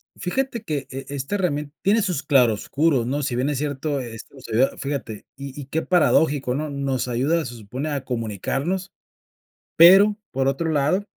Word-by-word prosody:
Fíjate 235 +4 -2
que 145 -7 -3
e 135 0 -6
esta 140 +7 -3
herramien 150 -6 -1
tiene 210 +3 +3
sus 180 -8 -1
claroscuros 135 +1 +2
¿no? 145 +3 -1
Si 120 - -1
bien 130 +4 0
es 145 - -1
cierto 145 0 -2
esto 120 +2 -9
sería 120 +3 +2
fíjate, 135 -7 -5
y 140 +1 -8
y 140 - -6
qué 155 +4 -2
paradójico, 150 -7 +2
¿no? 150 +3 -2
Nos 140 -3 -2
ayuda, 140 +8 +1
se 120 - -7
supone, 125 +7 -5
a 140 -3 -3
comunicarnos, 135 - -2 0.9
pero 195 +5 +8 0.2
por 135 +1 +1
otro 160 +4 -1
lado 155 +6 +1
140 Hz, 165 wpm, -23 LUFS, 130-160 Hz, 0.9 s, pero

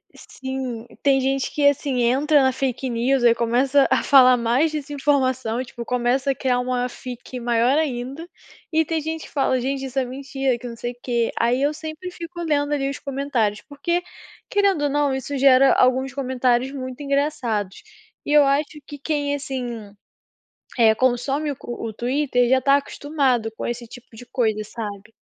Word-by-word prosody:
Sim. 260 -3 -6 0.2
Tem 270 -1 +4
gente 270 0 -1
que, 290 -1 +3
assim, 280 -3 +1
entra 280 +5 +3
na 260 0 +3
fake 260 0 -2
news, 245 +2 +1
aí 235 -1 +5
começa 255 +4 +2
a 260 - +3
falar 255 -2 +7
mais 245 +7 +1
dessa 295 -1 -5
informação, 260 -4 0
tipo, 240 -1 -9
começa 250 +2 +1
a - - -3
criar 250 -2 0
uma 250 0 -1
fic 250 0 -8
maior 240 +3 +2
ainda 275 +2 -3 0.5
e 320 0 +4
tem 320 +1 -2
gente 320 +1 -4
que - - -13
fala: 265 -3 +1
"Gente, 270 +1 -2
isso 265 +1 -2
é 255 - 0
mentira 270 0 -2
que 245 +1 -8
não 235 - -7
sei 240 +1 -5
o - - -25
quê". 235 -2 0
Aí 245 +3 +2
eu 290 +2 +2
sempre 315 +3 -7
fico 345 0 -8
lendo, 295 -2 0
ali, 275 -1 0
os 280 - -5
comentários. 265 -7 -1
Porque 340 +5 -2 0.5
querendo 400 -8 +2
ou - - +1
não, 290 -1 +1
isso 270 +1 -3
gera 270 0 +6
alguns 255 +1 +2
comentários 255 -1 0
muito 260 0 -7
engraçados 275 -9 -1 0.4
e - - -3
eu 295 -1 +7
acho 290 +2 0
que 290 - -8
quem, 285 0 -1
assim, 245 -7 -5 0.9
eh, 220 -2 +6
consome 260 +5 0
o 280 - -4
co 275 - -8
o 220 - -4
Twitter 245 +1 0
já 260 +1 +4
está 275 +2 +4
acostumado 275 -5 -1
com - - -4
esse 240 0 -4
tipo 240 -1 -14
de 245 - -10
coisa, 220 -5 0
sabe. 210 -1 -7
265 Hz, 185 wpm, -22 LUFS, 245-285 Hz, 0.9 s, falar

